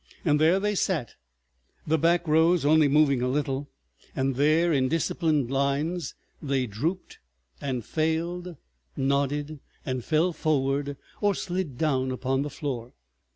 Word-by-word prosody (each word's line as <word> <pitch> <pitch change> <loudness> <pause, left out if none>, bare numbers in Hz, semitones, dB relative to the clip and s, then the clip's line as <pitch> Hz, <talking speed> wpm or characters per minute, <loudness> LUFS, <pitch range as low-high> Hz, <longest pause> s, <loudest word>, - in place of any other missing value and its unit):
There 155 +5 +4
they 210 +1 0
sat, 170 - -1 0.7
the 160 +1 +1
back 170 +2 +2
rows 160 +1 +3
only 155 0 +5
moving 140 -3 +3
a 125 - 0
little, 140 0 -2 0.5
and 135 0 0
there, 155 +5 +3
in 130 -2 +2
disciplined 155 -4 0
lines, 140 +5 -1 0.3
they 135 -3 0
drooped 150 - -4 0.4
and 130 -5 -3
failed, 170 +3 -2 0.4
nodded, 140 +2 0 0.3
and 130 -2 -3
fell 165 +6 +1
forward 145 -2 0 0.2
or 205 -2 +2
slid 175 -9 -3
down 130 -4 +1
upon 130 +1 -1
the 145 - -3
floor. 130 -5 -5
150 Hz, 130 wpm, -26 LUFS, 135-165 Hz, 0.7 s, only